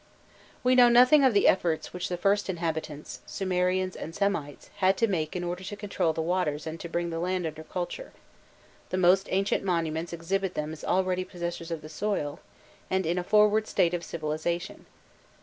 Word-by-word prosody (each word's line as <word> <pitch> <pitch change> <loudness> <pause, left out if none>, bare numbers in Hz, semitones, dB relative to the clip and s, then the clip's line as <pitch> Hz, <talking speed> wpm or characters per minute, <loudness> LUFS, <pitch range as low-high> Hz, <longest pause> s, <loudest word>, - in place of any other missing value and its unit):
We 250 0 +4
know 250 -1 +7
nothing 250 +5 +6
of 255 -5 +4
the 200 - +5
efforts 170 -4 +1
which 180 0 -3
the 180 - -2
first 200 +3 +1
inhabitants 160 -4 -4
Sumerians 185 0 0
and 165 - -7
Semites 200 -8 -2
had 190 0 +3
to 230 - +3
make 160 -6 -2
in 180 - -2
order 175 +1 -4
to 205 +2 -5
control 195 -5 -1
the 160 0 -2
waters 160 -4 -1
and 160 +1 -5
to 170 - -7
bring 170 0 -2
the 165 - -3
land 180 0 -1
under 160 0 -5
culture: 180 - -5 0.8
the 185 - -2
most 185 +2 +4
ancient 195 +1 +1
monuments 165 -3 -1
exhibit 185 +3 -2
them 150 +1 -3
as 155 - -10
already 185 0 +1
possessors 170 -2 -5
of 165 -2 -4
the - - -8
soil, 155 -4 -2 0.5
and 190 -1 0
in 170 +3 0
a - - -3
forward 210 +2 +4
state 170 -1 +2
of 175 -1 -2
civilization. 165 +2 -3
180 Hz, 185 wpm, -28 LUFS, 165-195 Hz, 0.8 s, know